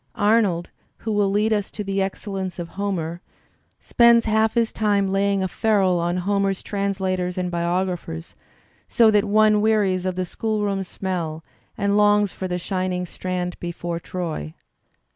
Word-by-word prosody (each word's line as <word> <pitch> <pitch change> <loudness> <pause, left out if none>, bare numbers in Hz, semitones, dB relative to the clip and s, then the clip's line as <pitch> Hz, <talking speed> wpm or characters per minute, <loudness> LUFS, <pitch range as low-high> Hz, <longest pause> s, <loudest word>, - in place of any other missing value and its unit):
Arnold, 205 -5 +2 0.3
who 225 - -4
will 205 -2 +2
lead 210 +2 +2
us 205 -2 -1
to 210 - -6
the 195 0 -1
excellence 190 -1 -4
of 170 -1 -5
Homer, 175 -4 -3 0.6
spends 235 -1 +4
half 220 +1 +2
his 230 -1 +1
time 200 -3 +1
laying 195 0 +1
a - - 0
ferule 195 -3 +2
on 175 +1 0
Homer's 195 +1 0
translators 190 -3 -2
and 180 -1 -2
biographers, 170 - -2 0.5
so 225 -2 +5
that 210 0 +3
one 215 0 +4
wearies 200 -4 +2
of 185 - -2
the 185 0 -1
school 215 +3 -2
room 195 -1 -1
smell 175 -4 -4 0.3
and 200 0 +1
longs 205 -1 +4
for 190 - -4
the 180 -1 -2
shining 185 0 -2
strand 180 0 -4
before 170 -1 -4
Troy. 165 - -5
195 Hz, 155 wpm, -23 LUFS, 180-210 Hz, 0.6 s, so